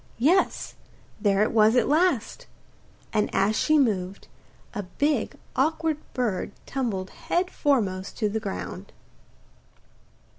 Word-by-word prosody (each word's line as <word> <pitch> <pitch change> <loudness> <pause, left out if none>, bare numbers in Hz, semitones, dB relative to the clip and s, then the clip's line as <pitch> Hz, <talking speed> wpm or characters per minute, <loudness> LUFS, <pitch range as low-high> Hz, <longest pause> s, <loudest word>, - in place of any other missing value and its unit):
Yes, 330 +10 +2 0.5
there 205 -1 +3
it - - 0
was 220 +1 +5
at 250 - +3
last; 310 - +1 0.7
and 210 -1 +2
as 200 +3 +3
she 310 +6 +3
moved, 200 -8 0 0.5
a 210 - -2
big 255 +7 -1 0.2
awkward 320 +2 +1 0.2
bird 220 -6 -1
tumbled 215 -9 -3
head 360 +1 -1
foremost 210 - 0
on 210 - +2
the 220 - 0
ground. 90 - -6
225 Hz, 115 wpm, -26 LUFS, 200-290 Hz, 0.7 s, was